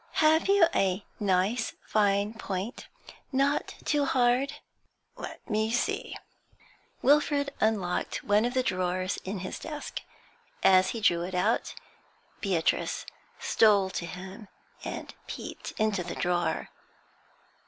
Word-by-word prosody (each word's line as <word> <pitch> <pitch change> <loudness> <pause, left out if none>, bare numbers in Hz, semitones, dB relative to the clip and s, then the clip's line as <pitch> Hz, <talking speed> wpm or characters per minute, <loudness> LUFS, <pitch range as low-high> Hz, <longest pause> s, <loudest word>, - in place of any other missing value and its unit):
Have 315 +2 +4
you 395 -3 +6
a 190 +1 +1
nice, 205 +3 +1
fine 205 0 +2
point, 205 +1 -5 0.4
not 275 +2 +1
too 295 -2 +2
hard?' 255 +1 +2 0.6
'Let - - -8
me 215 0 +1
see.' 240 +1 -1 0.9
Wilfrid 285 0 +3
unlocked 205 -5 0
one 205 +1 +3
of 245 +2 -1
the 255 - +3
drawers 185 -1 -1
in 190 0 -4
his 185 - -5
desk. 300 -1 -6 0.6
As 185 0 +6
he 230 - -4
drew 175 -6 +3
it 180 +1 -4
out, 180 - +1 0.6
Beatrice 185 -6 0 0.3
stole 200 -4 +4
to 170 - -3
him, 190 +4 -8 0.4
and - - -6
peeped - - -7
into 215 -4 +1
the 175 - -5
drawer. 175 -2 0
210 Hz, 120 wpm, -29 LUFS, 185-250 Hz, 0.9 s, you